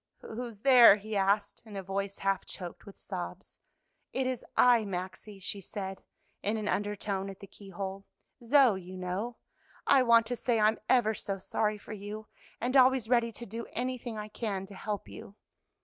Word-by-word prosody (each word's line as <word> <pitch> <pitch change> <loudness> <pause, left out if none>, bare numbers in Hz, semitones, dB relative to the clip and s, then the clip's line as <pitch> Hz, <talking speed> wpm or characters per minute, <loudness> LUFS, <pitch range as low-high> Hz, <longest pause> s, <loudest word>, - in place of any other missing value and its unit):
"Who's 225 -2 -7
there?" 245 -5 +9
he 215 +1 -6
asked 200 +1 +1
in 215 -3 -11
a 195 - -4
voice 195 +1 -3
half 195 -1 0
choked 180 0 -8
with 200 - -11
sobs. - - -7 0.5
"It 265 - 0
is 255 -2 -2
I, 245 -2 +6
Maxie," 190 +1 -6
she 200 +1 -5
said 190 0 -6 0.4
in 210 +2 0
an 215 -1 -3
undertone 205 -1 -1
at 195 - -9
the - - -9
keyhole, 195 0 -7 0.4
"Zoe, 240 -6 +5
you 185 +1 -9
know. 185 +6 -3 0.5
I 270 - +6
want 235 -2 +5
to 245 +2 -2
say 240 -1 +1
I'm 215 +1 +3
ever 240 -4 +4
so 195 -2 -3
sorry 210 +2 -1
for 210 - -9
you, 210 +1 -7 0.3
and 250 +3 -1
always 260 -3 +5
ready 235 -2 +3
to 235 - -8
do 230 +3 -6
anything 245 -2 -3
I 210 0 -5
can 205 -3 -3
to 200 - -12
help 205 +1 -4
you." 200 - -11
210 Hz, 180 wpm, -30 LUFS, 195-235 Hz, 0.5 s, there